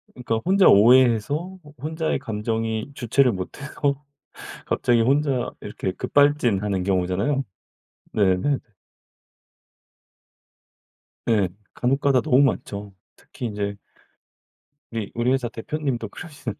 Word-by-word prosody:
그러니까 120 -3 -2
혼자 190 +1 +5
오해해서 130 - +4
호 150 0 -15
혼자의 160 -1 -1
감정이 110 +1 -3
주체를 125 -1 +2
못 90 -1 -4
하고 140 -1 -1 0.7
갑자기 120 -1 +2
혼자 135 0 +1
이렇게 95 - -4
급발진하는 105 -11 +2
경우잖아요. 95 +9 0 0.7
네네. 100 +7 +2 2.7
네 105 -5 +3 0.3
간혹가다 135 +1 +2
너무 125 +3 +3
많죠. 100 -6 -1 0.2
특히 125 - -9
인제 100 -1 -3 1.2
네 115 - -3
우리 105 - -6
우리 120 +2 +1
회사 130 -2 0
대표님도 120 -2 -3
그러시는데. 145 - -8
120 Hz, 260 characters per minute, -23 LUFS, 105-140 Hz, 2.7 s, 혼자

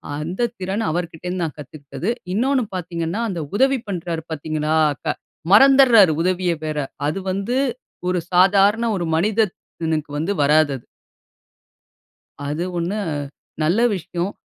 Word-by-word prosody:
அந்த 175 +10 -1
திறன் 195 +4 -2
அவருகிட்டருந்து 175 +2 -3
நான் 160 -3 -3
கத்துக்கிட்டது. 150 - -6 0.2
இன்னோன்னு 260 +5 +2
பார்த்தீங்கன்னா, 170 +2 -3
அந்த 180 -4 -3 0.2
உதவி 270 +4 +3
பண்றாரு 170 -3 -3
பார்த்தீர்களா! 155 0 -1 0.3
க - - -27 0.5
மறந்துருறாரு 240 - +7
உதவிய 180 0 +1
வேற. 155 -1 -3 0.3
அது 155 +6 -1
வந்து 200 +7 -1 0.5
1 180 0 +1
சாதாரண 200 +5 +4
1 175 -3 -2
மனிதனுக்கு 170 -5 -1
வந்து 160 +6 -1
வராது 150 +1 +4
அது. 120 - -18 1.6
அது 150 +4 -2
1 180 +5 -1 0.6
நல்ல 170 +8 +2 0.2
விஷயம். 180 +1 -3
180 Hz, 115 wpm, -21 LUFS, 160-205 Hz, 1.6 s, மறந்துருறாரு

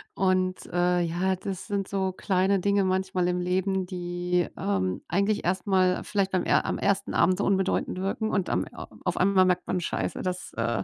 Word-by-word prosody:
und, 185 -1 +1
äh, 175 0 +2
ja, 175 +3 0
das 190 +1 -6
sind 200 -2 -2
so 190 -1 -1
kleine 190 +1 +1
Dinge 200 +1 +2
manchmal 185 -1 0
im 180 0 0
Leben, 185 +1 0
die, 175 -1 -1
ähm, 95 -2 -1
eigentlich 200 +4 +1
erst 185 +3 -1
mal 185 -1 +2
vielleicht 195 -2 0
beim 185 -2 +1
er - - +2
am - - -1
1. 200 0 0
Abend 185 +2 +3
unbedeutend 190 -2 0
wirken 195 +3 -1
und 190 -3 0
am - - 0
a - - -9 0.2
auf - - -1
einmal 190 0 +4
merkt 180 -1 +1
man: 185 - 0
„Scheiße, - - -2
das, 180 0 -4
äh, 115 -3 -1
185 Hz, 190 wpm, -27 LUFS, 180-195 Hz, 0.2 s, einmal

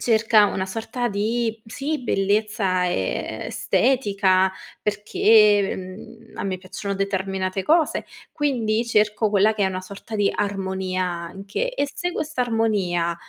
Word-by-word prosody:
cerca 220 -2 +4
una 190 - -2
sorta 225 +4 -3
di, 225 +2 -1
sì, 285 +5 -3
bellezza 195 -4 +1
estetica, 195 - +1 0.3
perché, 210 0 +4
mhmm, 220 +5 -11
a - - -2
me 190 -1 -2
piacciono 200 +2 -5
determinate 190 -1 -2
cose, 320 - +2 0.3
quindi 235 -6 0
cerco 215 -1 +2
quella 210 +1 +4
che 205 - -1
è - - +3
una 185 -1 -3
sorta 200 +3 -8
di 205 -1 +2
armonia, 190 -2 -2
anche. 195 - -4
E 285 - 0
se 355 +1 -3
questa 310 -4 -3
armonia, 200 -8 0
205 Hz, 125 wpm, -23 LUFS, 190-225 Hz, 0.3 s, cerca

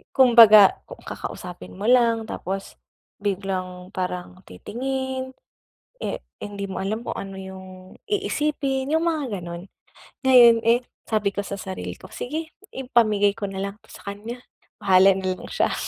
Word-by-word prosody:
Kung 255 -3 +5
baga 215 -4 +9 0.3
kakausapin 180 +1 -8
mo 205 - -5
lang 230 -2 +4
tapos 195 -3 -5 0.5
biglang 185 -2 -3
parang 180 0 -4
titingin, 260 +2 -4 0.6
eh, - - -4 0.2
hindi 200 -1 -6
mo 190 - -5
alam 215 +4 -2
kung - - -5
ano 195 -1 -6
yung 190 0 -9 0.4
iisipin, 295 -8 -1
yung 325 +1 +2
mga 270 - -2
ganun. 170 +1 -7 0.6
Ngayon, 240 -3 +8
eh, 240 +2 +4 0.2
sabi 210 -3 +1
ko 200 - -2
sa 200 0 -5
sarili 190 -1 -6
ko, - - -14
"Sige, 315 +5 -5 0.2
ipamigay 215 -6 +2
ko 205 -2 -5
na 195 0 -5
lang 200 0 -4
'to - - -26
sa 200 - -8
kanya, 230 +5 -8 0.3
bahala 190 0 +5
na 190 -1 -4
lang - - -10
siya. - - 0
210 Hz, 145 wpm, -23 LUFS, 195-255 Hz, 0.6 s, baga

